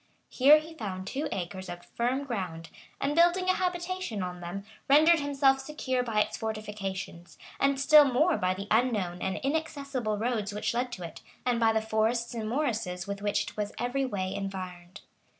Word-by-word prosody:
He 255 - -4
here 300 +2 +10 0.2
found 185 -3 -4
two 280 +9 -2
acres 185 0 -4
of 175 0 -8
firm 250 +4 -1
ground; 180 -10 -5 0.3
and 280 +1 0
building 350 +2 +4
a - - +5
habitation 360 - -2
on 180 0 -5
them, 175 +3 -6 0.2
rendered 315 +4 +6
himself 275 -2 +3
secure 270 -2 -2
by 225 -4 +1
its - - -1
fortifications, 200 -5 -5 0.2
and 275 0 +2
still 295 +1 +8
more 295 +6 +3
by 185 0 0
the 195 +1 -5
unknown 210 -7 +1
and 190 +1 -1
inaccessible 275 -6 -2
roads 220 -2 -1
which 215 +1 -1
led 245 +1 -1
to 180 - -6
it, 170 - -8 0.2
and 245 -2 +1
by 225 -1 +4
the 220 0 0
forests 220 +2 0
and 220 -2 -3
morasses 220 -10 -1
with 200 0 -5
which 205 0 +1
it - - -9
was 210 -1 -3
every 245 +3 -1
way 190 -5 -2
environed. 185 -1 -6
225 Hz, 180 wpm, -29 LUFS, 195-275 Hz, 0.3 s, here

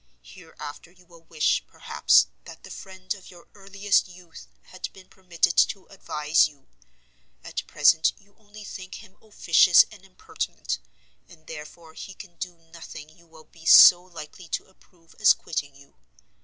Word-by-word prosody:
Hereafter 145 - -12
you 180 0 -24
will 170 -1 -20
wish, 155 -2 0
perhaps, - - +2 0.2
that - - -13
the - - -12
friend 185 0 -7
of 195 -3 -15
your 175 -1 -16
earliest 200 0 0
youth 180 - -15 0.2
had - - -8
been 190 -1 -16
permitted 175 -3 -1
to 200 -4 -8
advise 150 -5 +1
you; 140 -3 -21 0.8
at - - -6
present 160 +2 +3
you 200 0 -26
only 210 0 -14
think 185 -1 -9
him 190 -3 -14
officious 180 -4 +4
and 205 -3 -15
impertinent, 185 - -6 0.5
and 160 -2 -19
therefore 160 +1 -11
he 195 +4 -10
can 175 -4 -13
do 180 0 -6 0.2
nothing 155 -2 -11
you 170 +2 -23
will 160 -1 -17
be 160 +1 -20
so 175 -1 +9
likely 170 -1 -12
to - - -4
approve 175 -3 -26
as 215 - +6
quitting 145 -3 -6
you. 140 0 -20
175 Hz, 155 wpm, -25 LUFS, 160-190 Hz, 0.8 s, so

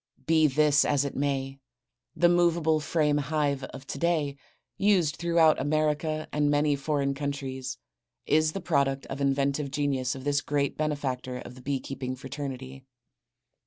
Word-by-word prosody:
Be 160 -1 +4
this 145 0 +4
as 145 -1 +1
it 140 - -4
may, 135 -1 -2 0.6
the 175 - +4
movable 170 -2 +3
frame 150 -1 +1
hive 145 -2 -1
of 130 - -10
today, 150 -1 0 0.4
used 185 -7 +2
throughout 170 -3 +3
America 155 +1 0
and 150 -1 +2
many 145 0 +2
foreign 140 -1 -1
countries, 135 -2 -4 0.5
is 155 +1 +2
the 195 - -4
product 140 -5 0
of 135 - -4
the 140 - +1
inventive 140 +1 0
genius 135 -2 -1
of 130 - -8
this 145 0 +1
great 140 -1 -1
benefactor 135 -4 -2
of 125 - -9
the 130 - -13
bee 135 +1 -1
keeping 130 -1 -5
fraternity. 135 -1 -7
145 Hz, 150 wpm, -27 LUFS, 135-155 Hz, 0.6 s, Be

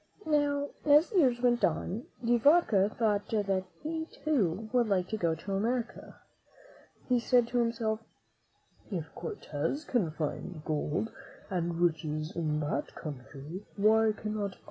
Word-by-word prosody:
Now, 290 -2 +1
as 300 +5 +5
the 390 - +3
years 250 -6 +3
went 240 -1 +3
on, 190 +7 0 0.2
De 240 +1 +4
Vaca 230 - +5
thought 210 -2 0
that 195 -3 0 0.2
he, 320 +1 -3
too, 225 - 0
would 245 -2 +3
like 185 -3 +2
to 220 - -2
go 170 -5 +1
to 190 +5 -5
America. 235 +4 -2 0.9
He 250 -1 +3
said 240 0 +3
to 245 - +1
himself, 230 -2 0 0.9
"If 170 -7 -4
Cortez 165 - -3
can 225 - +1
find 155 +1 -4
gold 160 +7 -1 0.4
and 170 -2 -1
riches 155 -2 0
in 155 -2 0
that 145 -1 -2
country, 145 +4 -7 0.2
why 220 +1 +4
cannot 210 -2 -3
I?" - - -25
210 Hz, 145 wpm, -30 LUFS, 170-245 Hz, 0.9 s, as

